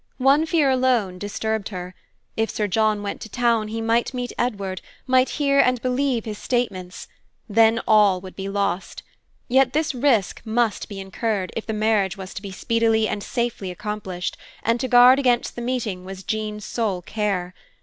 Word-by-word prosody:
One 275 +4 +4
fear 310 -4 +3
alone 245 -8 +1
disturbed 210 +1 -3
her. 180 -2 -6 0.4
If 225 0 0
Sir 210 - -1
John 215 +1 +1
went 200 - -5
to 220 - -7
town, 230 -1 +1
he 225 +1 -4
might 230 +3 +1
meet 245 -1 -3
Edward, 200 -6 -2 0.2
might 255 0 +3
hear 280 -1 +3
and 250 -2 +4
believe 255 -1 0
his 210 -2 -5
statements. 190 -8 -3 0.4
Then 225 +1 +4
all 205 -4 +5
would 185 0 -11
be 195 0 -5
lost. 195 -2 -2 0.4
Yet 260 0 +3
this 310 0 0
risk 245 -6 +1
must 225 -1 0
be 200 -2 -7
incurred, 195 0 -2
if 225 - -4
the 220 - -2
marriage 210 -3 +1
was 190 -1 -8
to - - -6
be 200 - -7
speedily 225 +2 +1
and 205 - -3
safely 235 -5 -2
accomplished; 185 -1 -4 0.3
and 230 +1 +1
to 260 - -1
guard 250 +2 +7
against 245 -3 +1
the 240 - -5
meeting 235 -7 -2
was 190 0 -8
Jean's 215 0 -3
sole 205 -7 -2
care. 195 -3 -2
220 Hz, 175 wpm, -23 LUFS, 200-245 Hz, 0.4 s, guard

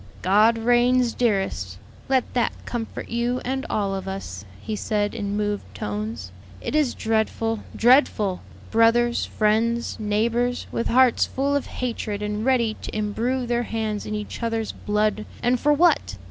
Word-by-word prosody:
"God 215 +5 +4
reigns, 245 +1 +3
dearest; 195 - -1 0.3
let 260 -2 +3
that 245 -2 +1
comfort 230 -2 -5
you 240 +2 0
and 265 +1 -2
all 200 -2 0
of 190 0 -4
us," 145 - -6
he 215 - -4
said, 205 -1 -1
in 205 -3 -3
moved 205 -1 -1
tones. 105 0 -4 0.3
"It - - -5
is 300 -5 +2
dreadful, 225 0 0 0.2
dreadful! 225 -6 +3 0.3
Brothers, 235 +1 +3
friends, 230 +3 0
neighbors, 230 +4 0
with 230 - -1
hearts 255 0 +4
full 280 +2 0
of 285 - -1
hatred 220 -4 -3
and 210 +1 -2
ready 235 -4 +2
to - - -6
imbrue 235 +5 -1
their 240 0 0
hands 220 -3 -3
in 215 - -3
each 210 +3 -6
other's 225 -1 -1
blood 210 0 0 0.2
and 245 +1 +2
for 295 - +3
what? 295 - +3
225 Hz, 150 wpm, -24 LUFS, 210-245 Hz, 0.3 s, God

